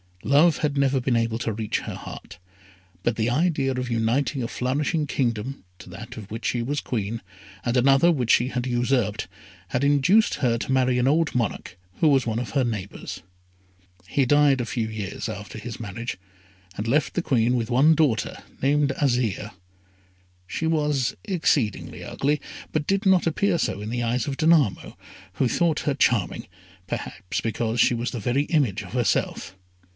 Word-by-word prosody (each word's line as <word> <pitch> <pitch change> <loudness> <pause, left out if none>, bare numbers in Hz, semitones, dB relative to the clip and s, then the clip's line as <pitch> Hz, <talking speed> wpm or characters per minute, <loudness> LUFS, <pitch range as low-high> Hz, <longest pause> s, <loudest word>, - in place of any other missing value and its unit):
Love 150 +4 +4
had 145 -2 -1
never 135 -1 +2
been 125 -1 0
able 115 0 0
to 115 -2 -2
reach 110 0 -2
her - - -6
heart, - - -9 0.7
but 120 - +1
the 115 +1 0
idea 145 0 +1
of 125 -1 -3
uniting 120 +5 0
a - - -2
flourishing 145 +6 -1
kingdom 125 -2 -2 0.2
to - - -12
that - - -9
of 105 -3 -9
which 110 +1 -6
she 120 - 0
was 140 +5 -1
Queen, 115 -3 -3 0.4
and 120 0 0
another 135 +6 +5
which 125 -8 -1
she 120 - +4
had 125 -2 -2
usurped, 120 -4 0 0.4
had 125 - -1
induced 145 +10 +4
her 120 -3 +1
to 135 - -3
marry 130 -1 +2
an 125 - +2
old 155 +2 +2
monarch, 115 -6 -2 0.2
who 160 - +3
was 135 -4 +4
one 110 -1 -1
of 125 - -5
her 135 -2 +2
neighbours. 105 -5 -5 0.9
He 140 +6 +1
died 145 -1 +4
a - - -2
few 115 -1 -2
years 110 -2 -5
after 105 0 -7
his 115 +1 -7
marriage, 115 0 -5 0.6
and 105 - -3
left 140 +5 +1
the 175 - 0
Queen 120 -3 +2
with 120 0 -2
one 140 +6 +5
daughter, 145 -7 +1 0.2
named 145 +1 +3
Azire. 120 -6 0 1.0
She 160 - -3
was 150 -5 +1
exceedingly 155 - 0
ugly, 145 +2 -1 0.3
but 155 -1 -1
did 195 +2 +1
not 190 -2 +4
appear 170 +3 +1
so 100 - -1
in 105 - -5
the 120 +1 -2
eyes 120 +3 0
of 135 -1 -3
Danamo, 155 - +2 0.4
who 130 - +1
thought 165 +4 +1
her 145 - 0
charming, 120 -8 +1 0.4
perhaps 90 - -4
because 115 +1 -2
she - - +5
was 120 +2 -2
the 120 - -4
very 125 +7 +1
image 130 - +1
of 90 - -11
herself. 120 -6 -1
125 Hz, 175 wpm, -24 LUFS, 115-145 Hz, 1.0 s, another